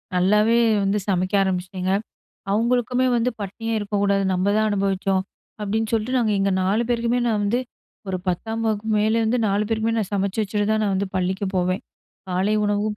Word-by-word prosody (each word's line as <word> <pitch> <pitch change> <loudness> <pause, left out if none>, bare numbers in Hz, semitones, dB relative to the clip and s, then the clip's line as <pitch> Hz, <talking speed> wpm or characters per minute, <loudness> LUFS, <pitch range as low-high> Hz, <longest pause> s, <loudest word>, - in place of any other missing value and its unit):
நல்லாவே 210 +5 +3 0.3
வந்து 195 +1 +1
சமைக்க 185 0 0
ஆரம்பிச்சிட்டேங்க. 185 0 -2 0.6
அவங்குளுக்குமே 245 +4 +1
வந்து 240 +1 +1
பட்னியா 225 +3 -4
இருக்கக்கூடாது 200 -1 0
"நம்ப 185 +1 0
தான் 215 0 +2
அனுபவிச்சோம்" 195 -1 0 0.4
அப்டின்னு 215 +2 -1
சொல்ட்டு 230 +3 0
நாங்க 225 -3 +1
எங்க 195 0 +1
4 200 +5 +2
பேருக்குமே 235 0 +1
நான் 220 -3 +1
வந்து 215 +5 +1 0.5
ஒரு 185 -1 -1
10ஆம் 220 +6 -2
வகுப்புக்கு 215 0 0
மேல 220 +2 +2
இந்து 240 +3 +1
4 200 +1 +1
பேருக்குமே 225 0 0
நான் 205 -3 -2
சமச்சு 200 +1 0
வச்சுட்டு 205 0 -1
தான் 215 0 +1
நான் 200 -2 +1
வந்து 195 +1 -1
பள்ளிக்கு 190 +2 -1
போவேன் 185 +2 0 0.5
காலை 185 +3 +1
உணவும் 205 +1 0
205 Hz, 165 wpm, -23 LUFS, 195-225 Hz, 0.6 s, நல்லாவே